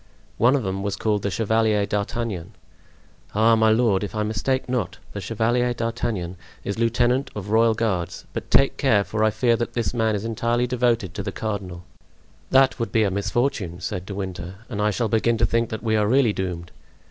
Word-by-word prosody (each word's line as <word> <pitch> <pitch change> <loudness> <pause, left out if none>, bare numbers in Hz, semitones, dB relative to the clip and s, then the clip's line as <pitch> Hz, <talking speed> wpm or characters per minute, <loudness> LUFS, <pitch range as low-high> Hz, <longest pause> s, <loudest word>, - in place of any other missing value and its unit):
"One 125 +4 +5
of 135 - 0
them 95 0 -2
was 100 0 -2
called 105 0 0
the 100 - -1
Chevalier 110 +1 +1
d'Artagnan." 105 -2 -3 0.8
"Ah, 115 +2 +5
my 110 0 +4
lord, 110 -3 +3
if 105 - -5
I 105 - 0
mistake 110 +5 -1
not, 125 -7 -2 0.2
the 100 - -5
Chevalier 120 +4 0
d'Artagnan 115 -6 -3 0.3
is 100 +2 -3
lieutenant 120 +3 +2
of 105 0 -5
royal 115 0 +4
guards; 105 -7 -2
but - - -5
take 135 - +4
care, 110 -8 +3
for 110 +1 -2
I 110 - +5
fear 115 +2 +2
that 120 - -3
this 120 -1 -1
man 110 -2 +1
is 100 +2 -4
entirely 115 +2 0
devoted 120 -6 0
to - - -4
the 100 - -4
cardinal." 95 -5 -4 0.7
"That 135 -1 +4
would 115 - -2
be 110 -2 +3
a 100 - +1
misfortune," 100 -2 -1
said 90 +1 -4
De 100 - -5
Winter, 95 -2 -5
"and 105 -4 -3
I 105 - +3
shall 115 +2 0
begin 115 +2 +2
to 115 - +3
think 115 +1 0
that 110 - -5
we 110 -1 +1
are 105 -1 +2
really 125 -2 +3
doomed." 90 -3 -4
110 Hz, 200 wpm, -23 LUFS, 100-115 Hz, 0.8 s, One